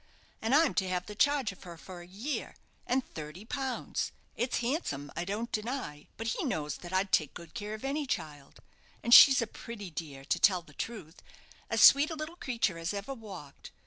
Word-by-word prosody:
And 225 +5 +2
I'm 315 -2 +5
to 190 - -4
have 180 -1 -1
the 210 - -8
charge 275 +1 +2
of 195 - -15
her 170 -2 -10
for 180 +1 -10
a 175 - -12
year, 215 +11 -4 0.3
and 255 +1 +1
thirty 155 +6 -8
pounds 265 +1 -3 0.2
it's 245 +1 0
handsome, 235 - -2
I 170 - -2
don't 215 +5 -3
deny, 215 - -4
but 225 0 -2
he - - -2
knows 150 - -2
that 175 - -10
I'd 190 +1 0
take 155 -3 +2
good 170 -2 -10
care 210 +1 -4
of 220 - -8
any 285 +1 -1
child 150 - -5 0.4
and 235 - +3
she's 270 -1 +10
a - - -1
pretty 210 -3 -8
dear, 140 -3 -7
to - - 0
tell 185 -3 +4
the - - -18
truth, 195 -8 -7 0.5
as - - +1
sweet 285 +2 +8
a 325 - -4
little 310 +2 -6
creature 230 - -1
as 165 +5 -2
ever 200 +7 -4
walked. 195 - -10
205 Hz, 205 wpm, -31 LUFS, 170-255 Hz, 0.5 s, she's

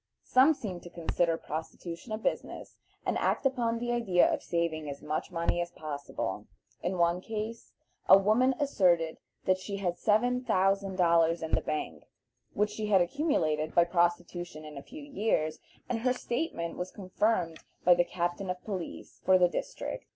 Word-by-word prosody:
Some 270 +5 +5
seem 190 -9 -5
to 175 - -11
consider 170 0 0
prostitution 165 +6 -6
a 215 - -1
business, 220 - -3 0.3
and - - 0
act - - 0
upon 240 -4 +1
the 240 +1 -2
idea 210 -7 +3
of - - -2
saving 165 -3 -1
as 140 0 -7
much 150 +1 -2
money 170 0 0
as 175 - -3
possible. 145 -4 -5 0.3
In 180 +1 -1
one 170 +1 +2
case 220 +2 -5 0.4
a 190 - +11
woman 225 +7 +3
asserted 175 - +2 0.3
that 185 0 +3
she 200 +1 -5
had 180 -3 -2
seven 245 +4 +2
thousand 195 -2 +1
dollars 170 -2 +3
in 160 - -4
the - - +3
bank, 80 - -4 0.5
which 210 +1 +1
she 215 0 -3
had 200 -2 +5
accumulated 170 - 0
by 170 - +7
prostitution 175 -2 -1
in 150 -1 -9
a 140 - -6
few 290 - -10
years, 210 - 0 0.3
and 240 - -1
her 250 +2 +2
statement 240 - -3
was 180 +1 -3
confirmed 185 -3 -1 0.3
by 180 - +8
the 175 0 +3
captain 175 +2 -2
of 180 0 -2
police 190 -5 -6
for 185 0 +6
the 180 -1 +5
district. - - -5
180 Hz, 170 wpm, -30 LUFS, 170-220 Hz, 0.5 s, a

